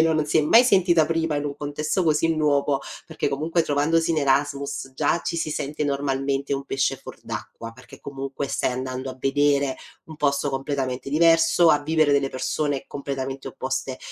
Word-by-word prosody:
non 160 -1 +3
si 155 +2 +1
è - - +5
mai 230 +11 +6
sentita 175 -8 +4
prima, 165 -2 -1
in 145 - -2
un 145 -1 -3
contesto 150 +5 -2
così 160 0 +2
nuovo, 145 -2 +1 0.3
perché, - - -2
comunque, 160 +4 0
trovandosi 160 +3 +1
in 155 - +1
Erasmus, 140 0 -1
già 150 +4 +1
ci 170 - -3
si 160 -1 -2
sente, 150 0 -3
normalmente, 140 0 -1
un 135 0 -4
pesce 135 0 0
fuor - - -12
d'acqua, 115 0 -7
perché, 125 +1 -15
comunque, 135 0 -5
stai - - 0
andando 130 +1 -4
a 130 - -10
vedere, 140 0 +1 0.3
un 160 -1 -11
posto 140 0 0
completamente 135 -1 -3
diverso, 165 +2 +4
a 145 - +4
vivere 155 -1 +2
delle 140 -1 +1
persone 145 +2 -2
completamente 135 -1 -5
opposte, 130 0 -4
145 Hz, 175 wpm, -24 LUFS, 135-155 Hz, 0.3 s, mai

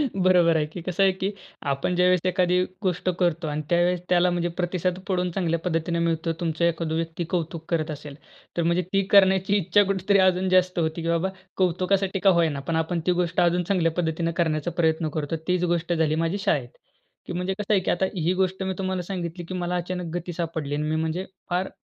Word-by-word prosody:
बरोबर 180 -3 +4
आहे 150 - +1
की. 165 +3 -8
कसं 185 +3 0
आहे, 195 - +5
की 190 +2 -2 0.4
आपण 140 +6 -1
ज्यावेळेस 180 0 +4
एखादी 180 0 +2 0.2
गोष्ट 185 -2 0
करतो 170 -2 +1
आणि 150 0 -2
त्यावेळेस 175 0 +2
त्याला 180 0 +4
म्हणजे 175 -1 0
प्रतिसाद 180 0 -1
पडून 180 -2 0
चांगल्या 170 -2 0
पद्धतीने 170 0 -1
मिळतो. 165 0 0
तुमचा 165 0 0
एखादा 165 -1 -1
व्यक्ती 165 +1 -2
कौतुक 165 -2 -2
करत 155 -2 0
असेल, 145 -1 -8 0.4
तर 170 - +2
म्हणजे 170 +2 +2
ती 195 - +4
करण्याची 190 0 +5
इच्छा 195 +2 +3
कुठेतरी 195 0 +2
अजून 185 0 +1
जास्त 185 -1 +3
होते, 160 0 -1
की 165 - -3
बाबा 170 +3 +1 0.3
कौतुकासाठी 190 +2 +1
का 195 - +4
होय 165 -1 +3
ना? 145 -2 -4
पण 160 +4 -3
आपण 160 +2 0
ती - - +5
गोष्ट 175 +1 -1
अजून 175 0 +2
चांगल्या 175 -3 +1
पद्धतीने 165 -1 0
करण्याचा 155 0 0
प्रयत्न 160 -1 +1
करतो. 155 +1 -2
तीच 180 -1 +1
गोष्ट 175 -1 0
झाली 160 -2 +1
माझी 170 +5 -1
शाळेत. 195 - 0 0.6
की - - -5
म्हणजे 180 +2 -1
कसं 210 +1 0
आहे, 200 - +5
की - - 0
आता 185 +2 +1
ही 175 0 +1
गोष्ट 190 0 0
मी 190 - -1
तुम्हाला 185 -1 -2
सांगितली, 175 -1 -5
की 185 - -7
मला 180 -1 -2
अचानक 180 0 -3
गती 175 0 -4
सापडली 160 -4 -3
आणि 150 - -1
मी 155 - 0
म्हणजे 160 +4 -1 0.2
फार 180 +1 0
175 Hz, 210 wpm, -25 LUFS, 165-185 Hz, 0.6 s, आहे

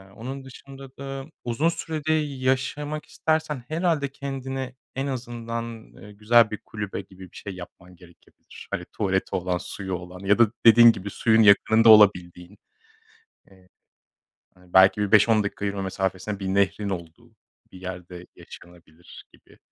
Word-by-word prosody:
onun 135 +4 -7
dışında 135 0 -13
da 135 0 -6 0.2
uzun 125 +7 0
sürede 155 -2 -3
yaşamak 145 +1 -2
istersen 155 -4 -2
herhâlde 160 -3 0
kendine 135 -2 -6 0.2
en 135 +1 -2
azından, 120 -3 -5 0.3
ııı, 105 - -13
güzel 110 +2 +3
bir 105 - -4
kulübe 105 -2 -5
gibi 95 -1 -15
bir - - -22
şey 100 -2 -7
yapman 90 0 -13
gerekebilir. 85 -1 -17
Hani - - -3
tuvaleti 95 -1 -2
olan 90 0 -1
suyu 95 +1 -6
olan 90 +1 -9
ya 100 +3 +1
da 115 -3 +5
dediğin 115 +1 +9
gibi 100 -2 -7
suyun 110 +2 +2
yakınında 110 +3 +5
olabildiğin. 90 -3 +4 0.9
Eee 95 -1 -22 0.9
Hani 90 -1 -23
belki 95 +3 +6
bir 105 -1 -2
5-10 105 0 +5
dakika 100 0 -5
yürüme 100 -1 -2
mesafesine 95 +1 -3
bir 95 - -4
nehrin 100 +1 0
olduğu 95 +6 -8 0.4
bir 95 - -12
yerde 90 -1 -8
yaşanabilir 85 -1 -15
gibi. - - -22
105 Hz, 145 wpm, -24 LUFS, 95-130 Hz, 0.9 s, dediğin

